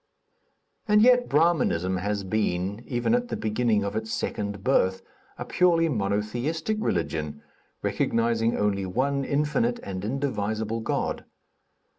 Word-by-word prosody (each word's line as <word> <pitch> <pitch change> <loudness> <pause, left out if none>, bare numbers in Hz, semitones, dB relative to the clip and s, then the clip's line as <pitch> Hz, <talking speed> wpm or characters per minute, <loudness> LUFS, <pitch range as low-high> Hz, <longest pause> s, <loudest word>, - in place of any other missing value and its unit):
And 210 0 +5
yet, 245 0 +5
Brahminism 140 - +2
has 100 +2 -2
been, 100 +1 -1
even 120 - 0
at 245 0 +1
the - - -3
beginning 110 -1 +1
of 100 +1 -3
its 110 0 -3
second 100 -1 -3
birth, 95 -8 +2 0.3
a - - -5
purely 170 -2 +3
monotheistic 120 - -1
religion, 75 - -2 0.4
recognizing 115 0 +1
only 100 -2 0
one 135 +7 0
infinite 150 - 0
and 95 -1 -5
indivisible 110 -3 -2
God. 110 - -2
110 Hz, 120 wpm, -26 LUFS, 100-150 Hz, 0.4 s, And